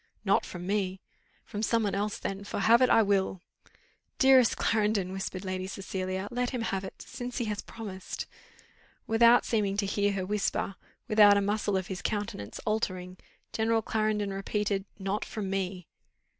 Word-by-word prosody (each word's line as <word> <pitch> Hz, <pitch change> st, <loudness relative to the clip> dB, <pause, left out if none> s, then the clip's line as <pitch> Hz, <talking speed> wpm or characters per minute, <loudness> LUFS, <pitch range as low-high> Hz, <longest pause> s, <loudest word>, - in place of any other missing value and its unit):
"Not 195 Hz, -, +3 dB
from 175 Hz, -1 st, -7 dB
me." 190 Hz, -1 st, -1 dB, 0.5 s
"From 205 Hz, -, -5 dB
some 230 Hz, +1 st, +2 dB
one 205 Hz, -, 0 dB
else 205 Hz, +1 st, -1 dB
then, 195 Hz, +1 st, -4 dB
for 200 Hz, -, -4 dB
have 230 Hz, +5 st, +6 dB
it 255 Hz, -, +5 dB
I 225 Hz, -, +6 dB
WILL. 195 Hz, -2 st, +1 dB, 0.8 s
"Dearest 265 Hz, -3 st, +6 dB
Clarendon," 210 Hz, -4 st, +1 dB
whispered 190 Hz, 0 st, -4 dB
Lady 185 Hz, 0 st, -3 dB
Cecilia, 190 Hz, 0 st, -4 dB
"let 245 Hz, 0 st, 0 dB
him 245 Hz, -3 st, -3 dB
have 195 Hz, -3 st, -2 dB
it, 190 Hz, -, -8 dB
since 245 Hz, 0 st, -6 dB
he 240 Hz, -, 0 dB
has 210 Hz, -2 st, -2 dB
promised 200 Hz, -5 st, -7 dB, 0.4 s
" -, -, -31 dB, 0.3 s
Without 235 Hz, +2 st, +5 dB
seeming 205 Hz, -3 st, 0 dB
to 205 Hz, -, +1 dB
hear 205 Hz, +1 st, +1 dB
her 190 Hz, -2 st, -2 dB
whisper, 200 Hz, 0 st, -1 dB, 0.3 s
without 210 Hz, -3 st, +7 dB
a -, -, +3 dB
muscle 205 Hz, 0 st, 0 dB
of 190 Hz, -, -2 dB
his 190 Hz, 0 st, -5 dB
countenance 205 Hz, -, -3 dB
altering, 185 Hz, -4 st, -2 dB, 0.4 s
General 225 Hz, 0 st, +1 dB
Clarendon 215 Hz, -2 st, 0 dB
repeated, 195 Hz, 0 st, -1 dB
"Not 195 Hz, +1 st, -2 dB
from 200 Hz, -3 st, -4 dB
me." 185 Hz, -2 st, -2 dB
205 Hz, 170 wpm, -29 LUFS, 190-220 Hz, 0.8 s, without